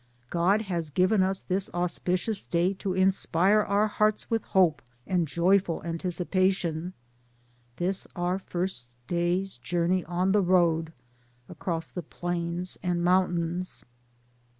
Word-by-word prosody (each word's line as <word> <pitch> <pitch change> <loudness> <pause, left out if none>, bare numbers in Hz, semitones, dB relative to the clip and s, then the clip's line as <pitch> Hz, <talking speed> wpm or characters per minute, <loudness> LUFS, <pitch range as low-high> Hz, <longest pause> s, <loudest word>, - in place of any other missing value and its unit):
God 190 +5 +2
has 170 -6 -3
given 185 +7 +3
us 190 +1 0
this 190 +1 -1
auspicious 180 +4 -1
day 175 +3 +1
to 190 -1 -3
inspire 190 +1 +3
our 205 0 +2
hearts 215 +1 0
with 225 -1 +2
hope 180 -5 +3 0.2
and 175 -3 +1
joy 175 +7 +4
ful 170 -4 -5
anticipation, 180 0 -1 0.8
this 185 +5 -2
our 180 +1 0
first 175 -11 -3
day's 175 -1 -1
journey 175 +6 0
on 180 +3 0
the 205 +1 +4
road 170 -3 +2 0.6
across 165 -3 -3
the 180 - -6
plains 175 +1 -4
and 175 -2 0
mountains. 180 -1 0
180 Hz, 125 wpm, -27 LUFS, 170-190 Hz, 0.8 s, joy